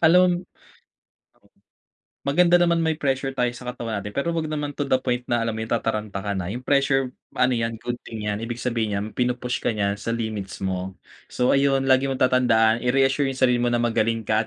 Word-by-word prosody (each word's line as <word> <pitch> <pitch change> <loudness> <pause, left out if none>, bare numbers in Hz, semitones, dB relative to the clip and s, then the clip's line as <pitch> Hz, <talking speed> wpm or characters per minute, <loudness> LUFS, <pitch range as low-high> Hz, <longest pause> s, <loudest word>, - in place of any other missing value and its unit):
Alam 180 +1 +4 1.8
Maganda 175 +5 +4
naman 170 -1 +3
may 160 -1 +1
pressure 135 -1 -1
tayo 125 -1 +1
sa 125 0 -9
katawan 115 -4 -4
natin, 105 +1 -8
pero 155 +5 -1
huwag 165 -2 -2
naman 150 -1 -3
to 145 0 -3
the 130 - +4
point 125 -1 -2
na, 120 -1 +1
alam 115 - -1
mo 110 - -5
yung, 110 - -5
tataranta 110 -3 -2
ka 100 - -1
na, 95 -3 -3
yung 120 +6 -5
pressure 135 -2 +2 0.2
ano 125 0 +3
yan, 115 -1 -1
good 120 0 -3
thing 110 -2 -6
yan, 105 0 -2
ibig 115 +1 -4
sabihin 115 -4 -1
nyan 100 - -2
pinu-push 125 0 -1
ka - - -1
niyan 100 -1 -1
sa 115 +2 -2
limits 110 -5 -5
mo. 95 0 -3 0.3
So, 125 0 +1
ayun 135 -1 +3
lagi 135 +1 +3
mong 135 -1 -1
tatandaan 120 -3 +3
i-reassure 135 +2 +2
yung 135 - -4
sarili 125 -2 +3
mo 120 - +2
na 120 - +1
magaling 115 -1 0
ka 110 +1 +1
125 Hz, 205 wpm, -24 LUFS, 110-135 Hz, 1.8 s, Alam